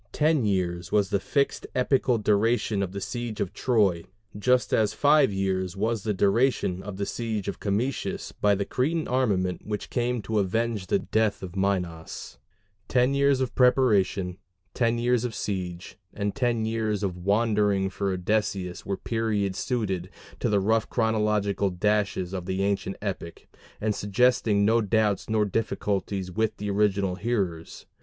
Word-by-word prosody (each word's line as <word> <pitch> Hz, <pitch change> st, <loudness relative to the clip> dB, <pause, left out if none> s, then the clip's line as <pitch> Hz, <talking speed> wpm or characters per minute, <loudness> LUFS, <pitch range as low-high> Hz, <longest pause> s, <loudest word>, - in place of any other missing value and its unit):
Ten 155 Hz, -5 st, +2 dB
years 90 Hz, -3 st, -1 dB
was 100 Hz, -2 st, +2 dB
the 100 Hz, -, +2 dB
fixed 140 Hz, +7 st, -1 dB
epical 130 Hz, -1 st, +2 dB
duration 105 Hz, 0 st, +1 dB
of 95 Hz, -2 st, -2 dB
the 100 Hz, -, -5 dB
siege 115 Hz, +2 st, -4 dB
of 95 Hz, -, -2 dB
Troy, 100 Hz, -9 st, +2 dB, 0.3 s
just 125 Hz, +4 st, +2 dB
as 110 Hz, -2 st, +2 dB
five 145 Hz, -3 st, +4 dB
years 95 Hz, -1 st, -1 dB
was 110 Hz, +1 st, 0 dB
the 105 Hz, -, -1 dB
duration 100 Hz, -1 st, +1 dB
of 95 Hz, -1 st, -7 dB
the 100 Hz, -, -1 dB
siege 110 Hz, -2 st, -3 dB
of -, -, -4 dB
Camicus 110 Hz, +7 st, -2 dB
by 105 Hz, -1 st, +2 dB
the 100 Hz, 0 st, -2 dB
Cretan 155 Hz, +5 st, -1 dB
armament 100 Hz, -8 st, 0 dB
which 105 Hz, -1 st, -4 dB
came 120 Hz, -2 st, -1 dB
to 110 Hz, +2 st, 0 dB
avenge 105 Hz, 0 st, -1 dB
the -, -, +2 dB
death 110 Hz, -3 st, 0 dB
of 90 Hz, 0 st, -7 dB
Minos: 90 Hz, -4 st, -3 dB, 0.5 s
ten 125 Hz, +2 st, +2 dB
years 140 Hz, -1 st, +3 dB
of 125 Hz, -2 st, -1 dB
preparation, 105 Hz, -8 st, +2 dB, 0.3 s
ten 115 Hz, -1 st, +1 dB
years 120 Hz, 0 st, +1 dB
of 120 Hz, -3 st, -3 dB
siege, 90 Hz, -2 st, -4 dB, 0.2 s
and 100 Hz, -1 st, -1 dB
ten 120 Hz, -4 st, 0 dB
years 110 Hz, -2 st, -1 dB
of 95 Hz, -3 st, -1 dB
wandering 100 Hz, +1 st, +1 dB
for 100 Hz, -2 st, -2 dB
Odysseus 95 Hz, -1 st, -1 dB
were 100 Hz, -, -3 dB
periods 105 Hz, -4 st, -1 dB
suited 100 Hz, -8 st, -2 dB, 0.3 s
to 120 Hz, -, 0 dB
the 105 Hz, -1 st, +3 dB
rough 110 Hz, +3 st, +1 dB
chronological 105 Hz, -3 st, +1 dB
dashes 100 Hz, -1 st, 0 dB
of 90 Hz, -2 st, -4 dB
the 95 Hz, +1 st, -1 dB
ancient 100 Hz, -1 st, -1 dB
epic, 95 Hz, -4 st, -5 dB, 0.3 s
and 105 Hz, 0 st, 0 dB
suggesting 105 Hz, 0 st, +2 dB
no 115 Hz, +2 st, +4 dB
doubts 105 Hz, -2 st, +1 dB
nor 110 Hz, -1 st, +2 dB
difficulties 100 Hz, -2 st, -2 dB
with 110 Hz, +3 st, -1 dB
the 105 Hz, 0 st, -3 dB
original 100 Hz, -2 st, +1 dB
hearers. 95 Hz, -8 st, -3 dB
105 Hz, 155 wpm, -26 LUFS, 95-115 Hz, 0.5 s, five